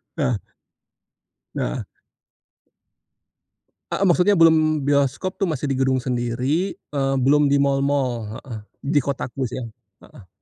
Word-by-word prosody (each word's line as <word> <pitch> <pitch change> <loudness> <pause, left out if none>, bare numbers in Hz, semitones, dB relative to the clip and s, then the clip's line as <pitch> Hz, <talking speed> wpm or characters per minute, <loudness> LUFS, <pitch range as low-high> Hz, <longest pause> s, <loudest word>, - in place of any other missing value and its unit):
Nah. 135 -8 0 1.2
Nah. - - -2 2.1
Heeh, 195 - 0
maksudnya 185 +2 +4
belum 155 -3 +4
bioskop 140 +7 0
tuh 195 - +1
masih 150 -3 -2
di - - 0
gedung 130 0 +2
sendiri, 125 +8 -1 0.2
eee, 135 -2 0
belum 145 +2 +4
di 140 - +3
mall-mall. 140 -1 +1 0.2
Heeh, 120 -5 -8 0.4
di 145 - +5
kotaku 135 -1 -3
sih 120 - -7
ya, - - -5 0.4
heeh. 95 - -16
140 Hz, 120 wpm, -22 LUFS, 130-155 Hz, 2.1 s, di